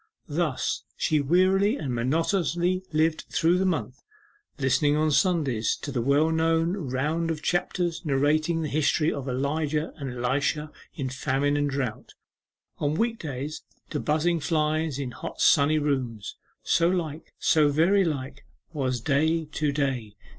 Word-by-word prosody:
Thus 155 -4 -1 0.2
she 155 -2 +1
wearily 190 - +3
and 135 - -3
monotonously 170 - 0
lived 155 +1 +1
through 170 +3 +2
the 190 - +2
month, 130 - -2 0.6
listening 140 +2 +2
on 155 0 +2
Sundays 140 - +1
to 145 - -5
the 125 -3 -1
well 145 +6 +3
known 165 +1 +2
round 155 +1 -1
of 155 -2 -3
chapters 175 -1 -1
narrating 155 +3 +1
the - - -1
history 155 +2 +1
of 140 -1 -5
Elijah 150 +4 -1
and 140 -3 -5
Elisha 140 +5 -1 0.2
in 135 -2 -3
famine 135 +2 0
and 145 0 +1
drought; 135 -5 -4 0.6
on 145 +1 0
week 230 +5 0
days 145 0 -5 0.3
to 150 - -1
buzzing 160 +4 +1
flies 155 -2 0
in 135 -3 -4
hot - - -8
sunny 150 +1 +4
rooms. 130 -8 -2 0.3
'So 170 - +3
like, 165 -4 -3
so 155 -2 +3
very 170 +7 +3
like, 140 -5 -4 0.3
was 130 -5 -1
day 160 +4 +1
to 150 -1 -1
day. 130 -7 -2
150 Hz, 145 wpm, -26 LUFS, 140-165 Hz, 0.6 s, sunny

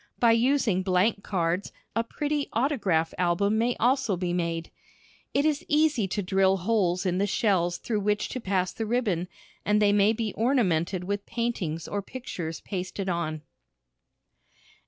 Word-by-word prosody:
By 235 -1 +5
using 230 -4 +2
blank 190 +3 +2
cards 175 0 -1 0.2
a 230 - +2
pretty 290 +4 -2
autograph 210 - +1
album 200 +5 +2
may 240 +2 +2
be - - -17
also 245 -5 +2
made. 170 -2 -2 0.6
It 280 - +3
is 300 -2 +1
easy 295 -8 +2
to 200 +2 -2
drill 190 +1 +3
holes 185 -2 +1
in 180 0 +1
the 200 - +2
shells 180 -4 +1
through 220 -3 -2
which 210 +1 0
to 255 - -5
pass 185 -3 0
the 225 - -4
ribbon, 210 -7 0 0.4
and 210 0 +2
they 205 -1 +4
may 205 +1 +4
be 220 -2 -2
ornamented 190 - +1
with 200 +2 -3
paintings 195 -9 -2
or 205 - -2
pictures 185 -8 -6
pasted 190 0 -4
on. 155 -3 -2
200 Hz, 155 wpm, -27 LUFS, 180-230 Hz, 0.6 s, By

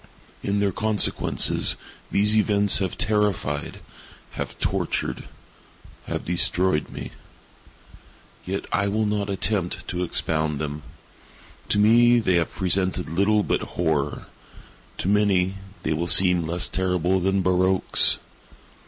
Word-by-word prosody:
In 100 +1 -1
their 100 -1 +1
consequences, 110 +2 +1 0.3
these 105 +2 +3
events 105 -2 +4
have 95 -3 -3
terrified—have 105 -9 -3
tortured—have - - -5
destroyed 90 -1 +1
me. - - -8 1.3
Yet 95 +2 -4
I 100 - +1
will 110 +2 0
not 105 -1 -2
attempt 100 -2 -2
to 90 0 -3
expound 80 -3 -1
them. 75 0 -5 0.9
To - - +1
me, 120 +3 +5
they 110 -6 +1
have 85 - -1
presented 95 -2 0
little 100 +5 +1
but - - -1
horror—to 80 +2 -5
many 95 -2 +1 0.3
they - - 0
will 85 +3 -2
seem 90 -3 +3
less 85 +2 +1
terrible 90 0 0
than 95 +1 0
barroques. 95 +1 +3
95 Hz, 110 wpm, -23 LUFS, 85-105 Hz, 1.3 s, me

